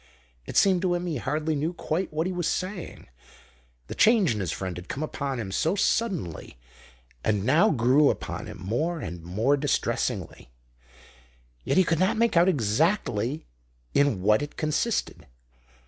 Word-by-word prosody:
It - - -3
seemed 190 -3 +4
to 180 -2 +1
him 175 0 -3
he 165 -5 -2
hardly 150 +5 -1
knew 155 +4 -1
quite 175 +2 -3
what 155 +2 -1
he 185 - -2
was 175 -2 -1
saying; 185 -2 -4 0.8
the - - -7
change 215 - +4
in 105 - -4
his 90 -5 -2
friend 95 0 -4
had 90 +1 -9
come 145 - -3
upon 140 -4 -3
him 100 -4 -5
so 160 - +1
suddenly 180 - -1 0.7
and 105 -3 +1
now 160 - +4
grew 135 - +4
upon - - -4
him - - -8
more 150 - -2
and 85 - -6
more 105 - +1
distressingly. 145 - -2 1.1
Yet - - 0
he 190 - +6
could 165 -2 0
not 185 +4 +2
make 230 -2 +2
out 170 +2 +5
exactly 135 - 0 0.5
in 140 -10 +2
what 105 +4 +4
it 145 - -6
consisted. 155 - -1
150 Hz, 165 wpm, -26 LUFS, 110-180 Hz, 1.1 s, he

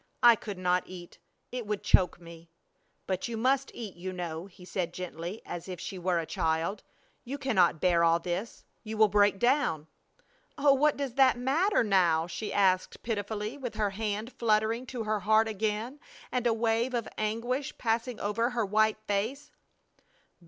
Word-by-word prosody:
"I 240 -1 +9
could 205 -3 -7
not 180 0 +1
eat! 175 -2 -11 0.3
It 245 -3 -5
would 210 -1 -2
choke 180 -2 +3
me!" 170 -1 -13 0.6
"But 185 +2 -2
you 235 -1 -4
must 265 +4 +1
eat, 215 -6 -6
you 185 +2 -5
know," 175 -1 -5
he 180 -1 -15
said, 175 -2 -3
gently, 180 +2 -6
as 175 +2 -6
if 180 -2 -6
she 185 +1 -6
were 180 0 0
a - - +1
little 160 - -7
child. 165 +5 0 0.4
"You 270 +4 -5
cannot 205 - +2
bear 170 -1 +3
all 165 0 +5
this. 180 +6 -5 0.2
You 220 0 -5
will 215 -1 +5
break 205 0 +4
down." 240 - +1 0.7
"Oh, 280 0 +5
what 295 +2 +3
does 275 -4 -3
that 265 -1 +4
matter 290 - +2
now?" 175 -6 +3
she 180 +5 -5
asked, 185 -2 +1
pitifully, 215 +3 -3
with 250 -4 -5
her 210 -2 0
hand 215 +3 -3
fluttering 225 +2 +1
to 240 -3 -4
her 215 -1 0
heart 215 +3 +3
again 220 +5 -2 0.3
and 245 -1 0
a - - +3
wave 230 +2 0
of 235 -3 -2
anguish 240 +6 -2
passing 235 +1 -1
over 220 +4 0
her 240 -3 -1
white 215 +2 +2
face. 225 +9 -2
215 Hz, 175 wpm, -29 LUFS, 185-240 Hz, 0.7 s, I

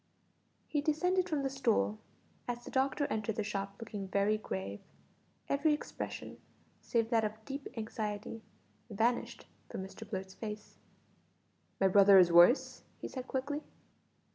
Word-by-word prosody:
He 295 - 0
descended 360 +5 +1
from 295 -3 0
the 270 - 0
stool, 230 -5 +1 0.5
as 240 0 -3
the - - -8
doctor 270 +2 +1
entered 215 0 -1
the 215 - -1
shop 195 -1 -3
looking 210 -3 -6
very 200 +2 +2
grave. 100 - -4 0.7
Every 300 +2 +3
expression, - - -6 0.4
save 230 0 0
that 225 -1 +4
of 215 +1 -4
deep 275 0 -5
anxiety, 215 -1 -4 0.5
vanished 230 +3 0 0.2
from 190 - -5
Mr 200 +3 -10
Blurt's 190 -2 -4
face. 210 -1 -7 1.0
"My 195 - +5
brother 195 +1 +7
is 180 -2 +7
worse?" 175 +10 +6 0.2
he - - -5
said 255 -1 -6
quickly. 285 +3 -2
220 Hz, 140 wpm, -33 LUFS, 200-270 Hz, 1.0 s, brother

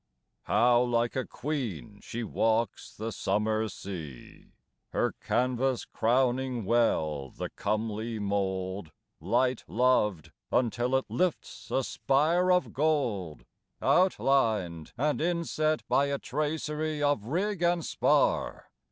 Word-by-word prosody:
How 120 0 +4
like 120 -1 +1
a 130 -2 -2
queen 110 - -4
she 120 +1 -5
walks 110 0 0
the 110 +2 -4
summer 110 +2 0
sea; 80 -13 -9 0.5
Her - - +1
canvas 130 +1 0
crowning 125 0 +1
well 80 - +1
the - - -6
comely 110 +2 -2
mold 95 -3 -2 0.3
Light 120 +8 +1
loved 105 -5 +1 0.2
until 120 +1 +1
it 130 - +1
lifts 180 -2 -2
a 135 - +1
spire 165 +9 +2
of 180 0 +2
gold 125 - -1 0.3
Outlined 110 - +2
and 150 +4 0
inset 160 -2 0
by 140 - +3
a 140 0 -1
tracery 150 +1 -2
Of 145 -8 +1
rig 185 - -1
and 170 -1 +2
spar. - - +1
120 Hz, 110 wpm, -29 LUFS, 105-145 Hz, 0.5 s, How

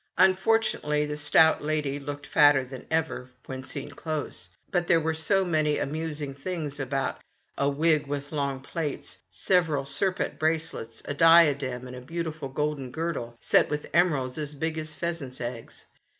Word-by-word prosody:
Unfortunately, 185 -6 +3
the 150 0 -4
stout 150 +1 +4
lady 150 -2 -1
looked 145 +1 -6
fatter 145 -3 +5
than 130 0 -10
ever 160 -5 -1 0.2
when 130 0 -6
seen 135 +2 -6
close, 155 -2 -5 0.2
but 175 -2 +1
there 165 - +5
were 160 0 0
so 190 +5 +2
many 155 -3 +1
amusing 150 -1 -3
things 145 0 -5
about 135 0 -2 0.2
— - - -45
a 140 - +3
wig 155 +1 +2
with 145 0 -4
long 140 -3 -2
plaits, 150 +1 -5
several 150 - +1
serpent 185 +7 +1
bracelets, 155 -8 -2
a - - -3
diadem, 145 -6 +5
and 125 0 -8
a 125 - -8
beautiful 160 0 -4
golden 150 -1 -2
girdle 130 -6 -4
set - - +3
with 150 0 -4
emeralds 150 -7 +2
as 150 -1 -4
big 160 +2 -2
as 155 0 -5
pheasants' 155 -6 -4
eggs. 120 -1 -6
150 Hz, 160 wpm, -27 LUFS, 135-160 Hz, 0.2 s, fatter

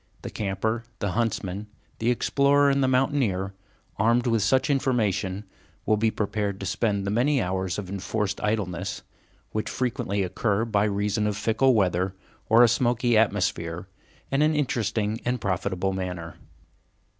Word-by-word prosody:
The - - -6
camper, 110 +3 -2
the 100 -3 -2
huntsman, 105 -2 -2 0.3
the 115 - +1
explorer, 140 +3 +3
and 135 0 +2
the - - +3
mountaineer, 125 -8 +1 0.4
armed 115 +3 +3
with 115 -3 +2
such 130 +6 +2
information, 105 -8 0 0.4
will 110 - +3
be 110 +1 +2
prepared 105 -2 -2
to 95 - -5
spend 100 +1 0
the 100 - -1
many 135 +6 +2
hours 95 -2 -1
of 105 -3 -5
enforced 100 +1 -3
idleness, 105 -5 -2 0.5
which 110 - -2
frequently 105 -5 -1
occur 105 +4 0
by 105 -2 +1
reason 105 +1 0
of 105 -1 -2
fickle 115 +5 +3
weather 95 -2 +1 0.3
or 115 +2 +7
a - - +7
smoky 120 0 +2
atmosphere, 90 -5 0 0.4
in 135 +1 +2
an 155 +1 +3
interesting 115 -5 -1
and 125 0 -1
profitable 95 0 -1
manner. 90 -3 -4
105 Hz, 145 wpm, -26 LUFS, 95-120 Hz, 0.5 s, or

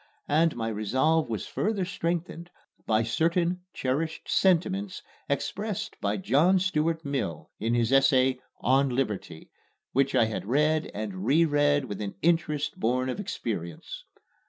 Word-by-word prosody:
And 160 +2 +3
my 115 -1 -3
resolve 130 +10 +1
was 110 -4 -3
further 205 -3 -1
strengthened 170 -1 -3 0.4
by 110 0 +3
certain 170 +8 +1
cherished 150 +5 -2
sentiments 190 +1 +1 0.3
expressed 200 +8 -3
by 100 +1 0
John 145 - +3
Stuart 165 -3 0
Mill 130 - -3
in 115 +2 0
his 120 0 +1
essay 130 -1 +4 0.2
"On 135 +2 +3
Liberty," 105 -10 -3 0.4
which 135 +1 +1
I 115 - +5
had 110 -2 -4
read 150 +5 +2
and 100 -3 -4
reread 145 +1 +3
with 105 -4 -6
an 100 -1 -4
interest 160 -3 +1
born 125 +3 0
of 130 - -3
experience. 100 - -5
140 Hz, 135 wpm, -27 LUFS, 115-165 Hz, 0.4 s, I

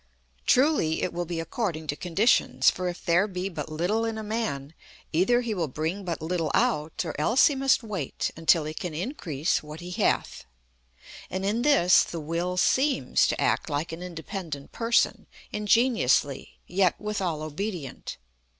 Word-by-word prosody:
Truly, 255 - +3
it 180 - -1
will 175 0 -2
be 170 -1 -3
according 165 -1 -3
to 145 - -2
conditions, 190 +9 +3
for 185 -1 -4
if 175 0 -6
there 175 +4 +3
be 185 -1 -3
but 155 -4 -6
little 180 +8 0
in 225 -1 -2
a 220 - -5
man, 210 -10 -3 0.4
either 220 +10 +3
he 235 -3 -2
will 175 -5 -1
bring 160 +8 -3
but 170 -3 -4
little 165 -1 -1
out, 155 +3 0
or 160 - -3
else 230 - +5
he 290 - +4
must 270 -1 +2
wait 195 - -3
until 165 0 +3
he 155 - -4
can 160 0 -5
increase 165 - -1
what 150 +1 -9
he 175 +1 -8
hath. 125 - 0 0.8
And 190 +1 -3
in 215 +4 0
this 250 -10 +5
the 170 - -6
Will 170 +4 -2
seems 265 +9 +2
to - - -1
act - - +1
like 150 +3 -2
an 165 +1 -7
independent 165 -4 -6
person, 230 0 +1 0.2
ingeniously, 210 - +2
yet 185 0 +1
withal 190 -7 -2
obedient. 155 -2 -5
180 Hz, 165 wpm, -26 LUFS, 160-210 Hz, 0.8 s, else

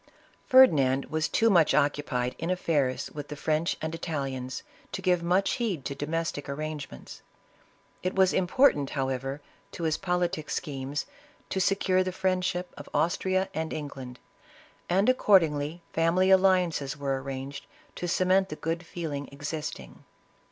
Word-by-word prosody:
Ferdinand 140 - +6
was 155 0 0
too 225 0 +3
much 165 -7 +4
occupied 140 -4 0
in 165 - -3
affairs 150 -8 0
with 145 -1 -7
the 150 - -6
French 155 +3 0
and 160 0 -2
Italians, 135 -6 -4 0.3
to - - -2
give 180 -2 +2
much 180 +3 +2
heed 190 - -1
to - - -2
domestic 150 0 -3
arrangements. 150 +1 -6 0.8
It 185 - -2
was 190 -1 +4
important, 180 - +3
however, 135 +1 -2 0.3
to 170 - -6
his 155 -1 +1
poli 180 -1 +1
tic 155 -3 -7
schemes, 140 -2 -3 0.5
to 190 - 0
secure 185 -1 +2
the 185 - -2
friendship 185 -1 -1
of - - -10
Austria 185 +3 +1
and 160 +1 -3
England, 135 -4 -6 0.7
and 195 +4 +3
accordingly 170 - +3
family 175 +4 +3
alliances 180 -7 +3
were 140 -1 -1
ar 135 - -2
ranged, 135 +1 -6 0.3
to 175 - -3
cement 185 +2 +2
the - - -5
good 165 +2 -3
feeling 155 -4 -5
existing. 150 +2 -6
160 Hz, 145 wpm, -28 LUFS, 140-185 Hz, 0.8 s, Ferdinand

